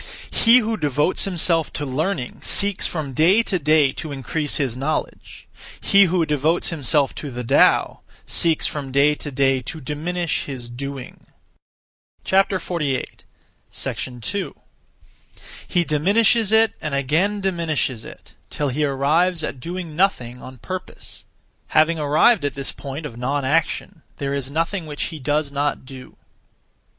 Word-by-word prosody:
He 230 Hz, +2 st, +6 dB
who 225 Hz, -2 st, 0 dB
devotes 150 Hz, +2 st, +1 dB
himself 170 Hz, -4 st, +1 dB
to 150 Hz, -, -3 dB
learning 140 Hz, 0 st, -3 dB
(seeks) 200 Hz, -1 st, +1 dB
from 150 Hz, -5 st, -4 dB
day 180 Hz, -, +4 dB
to 190 Hz, -5 st, -1 dB
day 150 Hz, -2 st, +3 dB
to 155 Hz, +2 st, -7 dB
increase 145 Hz, +2 st, -2 dB
(his 135 Hz, -6 st, -1 dB
knowledge); 140 Hz, +5 st, -4 dB, 0.3 s
he 200 Hz, 0 st, +5 dB
who 175 Hz, -2 st, +1 dB
devotes 150 Hz, +3 st, +1 dB
himself 145 Hz, -3 st, +1 dB
to 145 Hz, -, -6 dB
the 125 Hz, -1 st, -5 dB
Tao 115 Hz, -, +3 dB, 0.3 s
(seeks) 165 Hz, -2 st, +3 dB
from 140 Hz, -3 st, -2 dB
day 140 Hz, +2 st, +4 dB
to 150 Hz, -, -6 dB
day 135 Hz, -1 st, +1 dB
to 160 Hz, +6 st, -6 dB
diminish 160 Hz, +4 st, -2 dB
(his 125 Hz, -4 st, -7 dB
doing). 135 Hz, +1 st, -8 dB, 1.0 s
2. 170 Hz, -, -3 dB, 1.1 s
He 175 Hz, -2 st, +1 dB
diminishes 200 Hz, +8 st, +3 dB
it 220 Hz, 0 st, +4 dB
and 150 Hz, -2 st, -2 dB
again 160 Hz, +10 st, +1 dB
diminishes 165 Hz, -, -1 dB
it, -, -, -13 dB, 0.2 s
till 145 Hz, -1 st, -2 dB
he 145 Hz, +4 st, -1 dB
arrives 155 Hz, +5 st, +1 dB
at 135 Hz, -, -4 dB
doing 170 Hz, +1 st, -6 dB
nothing 125 Hz, -10 st, 0 dB
(on 130 Hz, 0 st, -10 dB
purpose). 185 Hz, +9 st, -8 dB, 0.4 s
Having 160 Hz, +1 st, +3 dB
arrived 155 Hz, +8 st, +4 dB
at 145 Hz, -, -2 dB
this 140 Hz, 0 st, -4 dB
point 140 Hz, +3 st, -7 dB
of 120 Hz, -6 st, -7 dB
non 135 Hz, +3 st, -1 dB
action, 160 Hz, +2 st, -1 dB, 0.2 s
there 140 Hz, 0 st, -2 dB
is 140 Hz, -2 st, -3 dB
nothing 165 Hz, +3 st, -2 dB
which 150 Hz, -1 st, -4 dB
he 155 Hz, -, -7 dB
does 145 Hz, +1 st, -1 dB
not 145 Hz, -1 st, -2 dB
do. 130 Hz, -1 st, -11 dB
150 Hz, 140 wpm, -21 LUFS, 140-175 Hz, 1.1 s, He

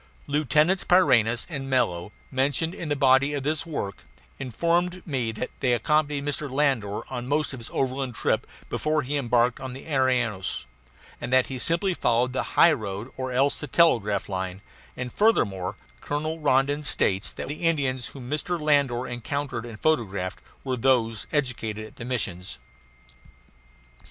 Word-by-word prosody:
Lieutenants 150 Hz, +5 st, +2 dB
Pyrineus 120 Hz, -10 st, +4 dB
and 140 Hz, -5 st, -5 dB
Mello, 95 Hz, -8 st, +1 dB, 0.2 s
mentioned 140 Hz, +5 st, +1 dB
in 170 Hz, -5 st, -6 dB
the 145 Hz, -, +1 dB
body 140 Hz, +1 st, +4 dB
of 140 Hz, -, -3 dB
this 155 Hz, +2 st, -1 dB
work, 100 Hz, -11 st, -4 dB, 0.4 s
informed 170 Hz, +8 st, 0 dB
me 130 Hz, -7 st, -1 dB
that 110 Hz, +3 st, -5 dB
they 125 Hz, -2 st, +2 dB
accompanied 145 Hz, +3 st, +1 dB
Mr. 145 Hz, 0 st, -2 dB
Landor 130 Hz, -8 st, +1 dB
on 125 Hz, -1 st, -4 dB
most 150 Hz, +1 st, 0 dB
of 130 Hz, -, -6 dB
his 115 Hz, -, -8 dB
overland 130 Hz, -2 st, -1 dB
trip -, -, 0 dB, 0.2 s
before 155 Hz, -1 st, 0 dB
he 140 Hz, +3 st, -2 dB
embarked 125 Hz, -2 st, +2 dB
on 130 Hz, -1 st, -6 dB
the 135 Hz, -, -9 dB
Arinos, 125 Hz, -9 st, 0 dB, 0.6 s
and -, -, -4 dB
that 130 Hz, 0 st, +5 dB
he 130 Hz, -, -4 dB
simply 170 Hz, +7 st, +1 dB
followed 125 Hz, -4 st, +1 dB
the 130 Hz, -, -3 dB
highroad 110 Hz, -, +3 dB
or 130 Hz, 0 st, -4 dB
else 135 Hz, +3 st, +2 dB
the 150 Hz, -, -5 dB
telegraph 115 Hz, -, +3 dB
line, 95 Hz, 0 st, -4 dB, 0.3 s
and 125 Hz, -1 st, -5 dB
furthermore, 100 Hz, -, +2 dB, 0.2 s
Colonel 155 Hz, +2 st, -3 dB
Rondon 145 Hz, 0 st, +2 dB
states 95 Hz, -8 st, +1 dB
that -, -, -6 dB
the 145 Hz, +3 st, -5 dB
Indians 140 Hz, -7 st, 0 dB
whom 130 Hz, -3 st, -9 dB
Mr. 155 Hz, +5 st, -2 dB
Landor 140 Hz, -5 st, +2 dB
encountered 120 Hz, 0 st, -3 dB
and 110 Hz, -3 st, -9 dB
photographed 100 Hz, -11 st, 0 dB, 0.2 s
were 130 Hz, -2 st, -2 dB
those 115 Hz, -3 st, +2 dB
educated 115 Hz, -7 st, -1 dB
at -, -, -14 dB
the 115 Hz, -, -6 dB
missions. 95 Hz, -8 st, -2 dB
130 Hz, 155 wpm, -26 LUFS, 115-150 Hz, 0.6 s, that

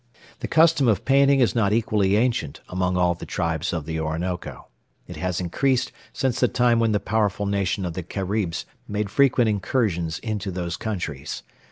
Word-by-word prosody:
The -, -, -4 dB
custom 160 Hz, -4 st, +4 dB
of 110 Hz, -4 st, +2 dB
painting 140 Hz, 0 st, +4 dB
is 120 Hz, -, +3 dB
not 105 Hz, -4 st, +2 dB
equally 105 Hz, -3 st, +2 dB
ancient 110 Hz, -, 0 dB
among 90 Hz, 0 st, -1 dB
all 90 Hz, -1 st, +3 dB
the 85 Hz, -, -11 dB
tribes 80 Hz, -3 st, -1 dB
of 85 Hz, -4 st, -3 dB
the 80 Hz, 0 st, -3 dB
Orinoco. 80 Hz, +3 st, -4 dB, 0.4 s
It -, -, -9 dB
has 90 Hz, -2 st, -2 dB
increased 125 Hz, +9 st, 0 dB, 0.2 s
since 130 Hz, -3 st, -1 dB
the 125 Hz, -, +4 dB
time 120 Hz, -1 st, +2 dB
when 115 Hz, -1 st, +2 dB
the 105 Hz, -, +2 dB
powerful 105 Hz, -1 st, 0 dB
nation 100 Hz, -1 st, 0 dB
of 85 Hz, -, -3 dB
the 90 Hz, -, -4 dB
Caribs 95 Hz, 0 st, -2 dB, 0.2 s
made 105 Hz, -1 st, -2 dB
frequent 130 Hz, -4 st, +4 dB
incursions 100 Hz, -, 0 dB
into 105 Hz, -3 st, -4 dB
those 85 Hz, -2 st, -3 dB
countries. 80 Hz, -10 st, -4 dB
100 Hz, 175 wpm, -24 LUFS, 90-115 Hz, 0.4 s, custom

